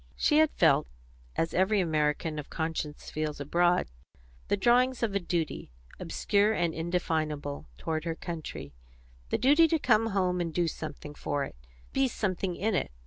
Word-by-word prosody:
She 300 - +3
had 315 -1 +5
felt, - - +4 0.5
as 165 - 0
every 190 +3 +3
American 155 -2 0
of 150 - -8
conscience 160 -2 -4
feels 155 -1 -3
abroad, 175 - +2 0.6
the 205 - +1
drawings 245 +4 +3
of 220 -4 0
a 200 - +2
duty, 170 -3 -2 0.3
obscure 205 +1 +1
and 170 -5 0
indefinable, 155 -4 -2
toward 155 - -2
her 165 -1 -2
country, 165 -2 -6 0.6
the - - +1
duty 295 +7 +5
to 325 - +2
come 225 -6 +3
home 185 -4 +1
and 165 -1 -2
do 170 +1 +1
something 150 -2 -6
for 145 -1 -2
it, - - -7 0.4
be 270 0 +3
something 190 -5 -2
in 215 +4 0
it. 185 - 0
175 Hz, 160 wpm, -29 LUFS, 155-210 Hz, 0.6 s, had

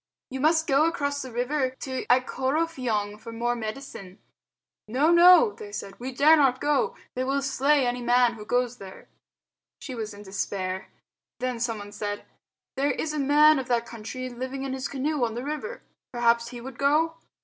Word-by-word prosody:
"You 265 - -4
must 320 +3 +3
go 285 0 +3
across 285 -4 -2
the 260 - -7
river 260 +2 -1
to 260 -1 -4
Ikorofiong 255 -5 0
for 230 +1 -9
more 240 +1 -1
medicine." 215 -4 -7 0.7
"No, 275 +9 +2
no!" 360 +6 +7
they 425 -2 -10
said, 195 - -7
"we 255 +2 -5
dare 290 +5 +6
not 270 -4 +3
go. 460 +11 +1 0.2
They 255 - -2
will 275 +1 0
slay 275 +1 +2
any 245 0 -1
man 245 0 +3
who 215 -2 -9
goes 245 +2 0
there." 190 -1 -12 0.7
She 265 - -7
was 220 -3 -5
in 205 - -11
despair. 190 -1 -4 0.5
Then 250 -1 -2
someone 220 -4 -3
said, 205 0 -5 0.5
"There 280 +1 +1
is 305 +1 -2
a 305 - -2
man 295 +2 +5
of 260 - -5
that 235 -2 +1
country 235 +3 -7
living 260 +2 -5
in 270 -1 -3
his 265 +1 -3
canoe 280 0 -1
on 230 -1 -1
the 240 - -4
river. 305 +12 -5 0.3
Perhaps 235 -1 +2
he 240 0 -8
would 250 +1 -9
go?" 310 +4 +2
255 Hz, 180 wpm, -26 LUFS, 235-290 Hz, 0.7 s, no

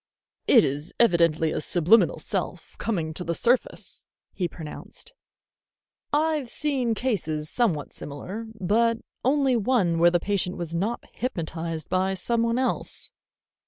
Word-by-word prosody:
"It - - +7
is 145 +5 -2
evidently 170 -7 +3
a - - -2
subliminal 175 +8 +4
self - - -4
coming 165 -8 -2
to 180 - -4
the 170 -1 -2
surface," 245 +7 -1 0.3
he 180 - -1
pronounced. 170 - -10 1.0
"I've 300 -3 +1
seen 260 -6 0
cases 160 -11 -2
somewhat 185 -12 0
similar, 190 +10 -7
but 225 +5 +2 0.3
only 270 -1 +3
one 200 -7 +2
where 170 +1 +7
the 175 0 +2
patient 185 -1 -1
was 170 -2 -4
not 205 +8 -1
hypnotized 165 - -4
by 190 +1 0
somebody 230 +4 0
else." 260 0 -3
190 Hz, 125 wpm, -25 LUFS, 165-235 Hz, 1.0 s, It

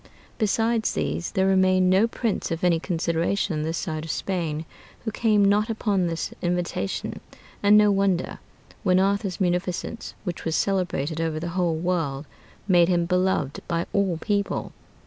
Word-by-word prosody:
Besides 225 +1 +1
these, 170 - -2
there 190 -2 +2
remained 185 -1 +4
no 195 +5 +4
prince 230 -2 -2
of 165 +1 -3
any 170 -2 +3
consideration 170 +2 -1
on 150 - -1
this 160 +2 -2
side 155 -4 -3
of 165 - -8
Spain, 165 -5 -2 0.4
who 220 - -1
came 215 -2 +3
not 205 +3 +3
upon 205 -5 0
this 165 -1 -3
invitation. 175 - -2 0.4
And 205 +1 +6
no 210 -1 +5
wonder, 195 -3 0 0.4
when 185 -2 +3
Arthur's 200 -1 0
munificence, 180 +4 -2
which 180 -4 -5
was 165 -1 -1
celebrated 175 -5 0
over 160 -1 -1
the 170 +2 -4
whole 175 -3 +1
world, 160 -5 -1 0.4
made 175 -3 +5
him 175 -1 +2
beloved 180 -5 0
by 170 -1 -1
all 195 -4 +1
people. 200 +4 -1
180 Hz, 155 wpm, -25 LUFS, 165-200 Hz, 0.4 s, And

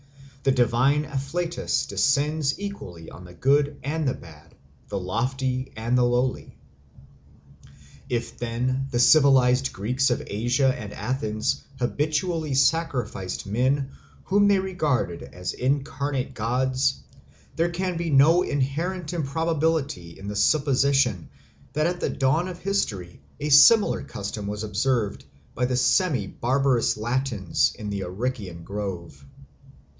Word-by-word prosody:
The 135 - +3
divine 130 +4 +2
afflatus 150 +5 -2
descends 145 +1 +1
equally 100 - -7
on 90 - -11
the 90 0 -13
good 145 - +2
and 150 +2 -1
the 130 - 0
bad, 80 -1 -15 0.3
the - - -4
lofty 130 +7 -2
and 115 +3 0
the 125 - +4
lowly. 125 +1 -1 1.5
If 120 -1 -3
then 125 +3 -1
the 120 - -2
civilised 130 -1 +5
Greeks 125 +7 0
of 120 - -1
Asia 120 +5 +1
and 105 -3 -7
Athens 110 -5 -2
habitually 155 +4 -1
sacrificed 135 - 0
men 130 +6 0 0.3
whom 205 +2 +3
they 200 -1 +4
regarded 155 - -1
as 90 0 -6
incarnate 135 0 -2
gods, 130 +3 0 0.5
there 165 +1 +1
can 180 +1 -2
be 170 0 -2
no 155 +5 +5
inherent 165 +4 -2
improbability 155 - -1
in 100 - -9
the 105 - -4
supposition 140 - +2 0.4
that 155 +1 +1
at 175 +1 -1
the - - -1
dawn 145 +6 +1
of 180 -2 -6
history 105 - -3 0.2
a 150 - -2
similar 200 +10 +6
custom 100 0 -6
was 105 +1 -4
observed 110 +1 -1 0.3
by 125 - 0
the 125 0 0
semibarbarous 130 - +1
Latins 120 -4 0
in 105 -1 -5
the 100 -1 -3
Arician 95 -2 -4
Grove. 90 -8 -6
130 Hz, 125 wpm, -25 LUFS, 110-150 Hz, 1.5 s, similar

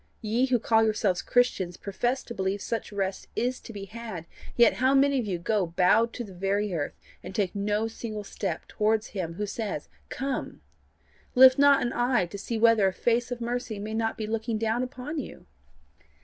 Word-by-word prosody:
Ye 230 +5 +1
who 255 -2 +3
call 225 0 +3
yourselves 210 -4 +1
Christians 195 -8 +1
profess 240 +6 -2
to 235 - -8
believe 190 -1 -1
such 230 -2 -3
rest 195 -1 -3
is 250 +1 -1
to - - -11
be 200 -2 -7
had, 215 -5 -7 0.3
yet 235 -2 +6
how 260 +2 +4
many 275 0 +4
of 230 - -3
you 185 -3 -1
go 190 +2 0
bowed 185 +7 +3
to 245 - -4
the 200 -4 -10
very 195 +2 -1
earth, 150 -4 -2 0.3
and 190 - -8
take 195 -4 0
no 210 +2 0
single 220 -2 -6
step 200 0 -4
towards 215 0 0
him 175 -5 -4
who 210 - -2
says 205 -6 -4 0.2
Come, 270 0 -4 0.7
lift 260 +1 +8
not 285 -1 +6
an 240 - -1
eye 245 -5 +2
to 185 +4 -8
see 225 +3 -3
whether 225 -3 +5
a 190 - 0
face 235 +5 +1
of 245 -1 -5
mercy 240 -2 -3
may 210 +2 -5
not 225 0 -1
be 220 - -3
looking 225 +1 -2
down 225 +2 0
upon 260 +4 -4
you! 275 - -8
220 Hz, 195 wpm, -27 LUFS, 200-240 Hz, 0.7 s, lift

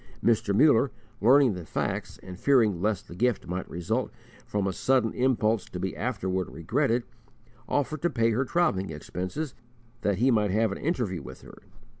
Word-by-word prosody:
Mr. 110 -3 +2
Muller, 135 +4 +5 0.3
learning 130 +1 +6
the 90 -2 -6
facts, - - -3
and 90 -1 -9
fearing 110 -10 +3
lest 105 -1 -1
the - - -10
gift 120 +4 0
might 90 +2 -4
result 110 +9 -2 0.4
from 100 -1 -1
a 95 - -1
sudden 125 +1 +1
impulse 115 -5 +1
to 90 - -7
be 95 +1 -3
afterward 95 -6 -2
regretted, 120 - 0 0.7
offered 145 +1 -1
to 175 - +2
pay 115 -5 +1
her 120 +5 +1
travelling 135 - +1
expenses 95 - -5 0.5
that 100 -2 +1
he 130 +5 +3
might 105 -3 +2
have 110 +2 +2
an 100 - -5
interview 120 - -1
with 65 -1 -10
her. - - -13
110 Hz, 170 wpm, -27 LUFS, 95-130 Hz, 0.7 s, learning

